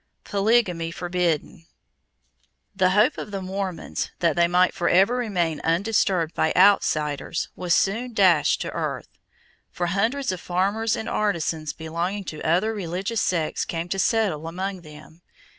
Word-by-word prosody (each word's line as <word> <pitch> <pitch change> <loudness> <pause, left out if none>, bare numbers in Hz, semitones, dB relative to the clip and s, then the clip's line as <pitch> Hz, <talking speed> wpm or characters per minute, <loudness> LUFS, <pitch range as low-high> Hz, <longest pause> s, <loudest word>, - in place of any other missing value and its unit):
Polygamy 200 -5 +1
Forbidden. 170 -2 -2 1.1
The 185 -1 +3
hope 210 +5 +3
of - - -6
the 200 -1 -4
Mormons 190 -1 -4
that 170 -3 +1
they 170 0 +4
might 180 +1 +3
forever 195 +5 +3
remain 180 -11 -1
undisturbed 175 -1 +1
by 160 - +1
outsiders 155 -6 +2
was 175 -1 +1
soon 230 +4 0
dashed 180 -7 +4
to - - -4
earth, - - -4 0.6
for 175 - -3
hundreds 225 +9 0
of 185 - -5
farmers 200 +5 0
and 220 - -5
artisans 165 -6 -1
belonging 170 +5 -4
to 155 -4 -7
other 180 +7 +1
religious 195 +3 -3
sects 165 -4 0
came 170 0 -4
to 195 - -2
settle 190 -9 +1
among 185 +2 -4
them. 155 +1 -14
180 Hz, 140 wpm, -24 LUFS, 165-200 Hz, 1.1 s, they